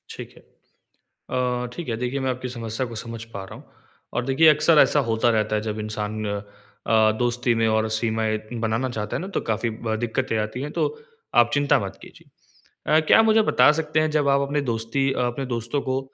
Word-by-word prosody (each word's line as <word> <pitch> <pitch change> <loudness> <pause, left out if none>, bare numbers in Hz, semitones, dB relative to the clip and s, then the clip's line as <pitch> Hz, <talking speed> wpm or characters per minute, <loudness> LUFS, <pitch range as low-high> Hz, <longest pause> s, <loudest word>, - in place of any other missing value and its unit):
ठीक - - -9
है। - - -15 0.7
अ, 125 -1 -3
ठीक 165 0 -6
है, 115 - -1
देखिए, 125 +3 -2
मैं 130 -1 -1
आपकी 125 0 -5
समस्या 115 +1 -4
को 115 - -9
समझ 115 0 -6
पा 100 - -5
रहा - - -11
हूँ। - - -13 0.5
और 120 - -1
देखिए, 135 +5 +4
अक्सर 155 +1 +4
ऐसा 145 - +5
होता 115 +1 +2
रहता 110 -1 +1
है 105 - 0
जब 110 0 -4
इंसान 105 0 -4 0.6
अ, 110 -1 +5
दोस्ती 120 0 +1
में 115 0 +2
और 110 0 +1
सीमाएँ 110 -1 0 0.2
बनाना 115 +3 0
चाहता 105 -3 -4
है - - -2
ना, 185 - -5
तो 195 - -3
काफ़ी 110 +1 -1
ब 110 0 -3
दिक्कतें 120 0 -1
आती 110 +4 -3
हैं, 145 +2 -4
तो - - -1 0.6
आप 120 - +1
चिंता 145 0 +3
मत 100 -3 -6
कीजिए। - - -15 0.7
अ, 155 - +7
क्या - - +7
आप 225 - +5
मुझे 220 0 +5
बता - - +6
सकते 155 0 0
हैं, 155 0 +1
जब 150 -2 +1
आप 140 0 +3
अपने 145 +1 0
दोस्ती 115 +5 -1
अ, - - -4
अपने 130 +3 -4
दोस्तों 120 +5 -2
को 130 0 -1
120 Hz, 215 wpm, -23 LUFS, 110-140 Hz, 0.7 s, अ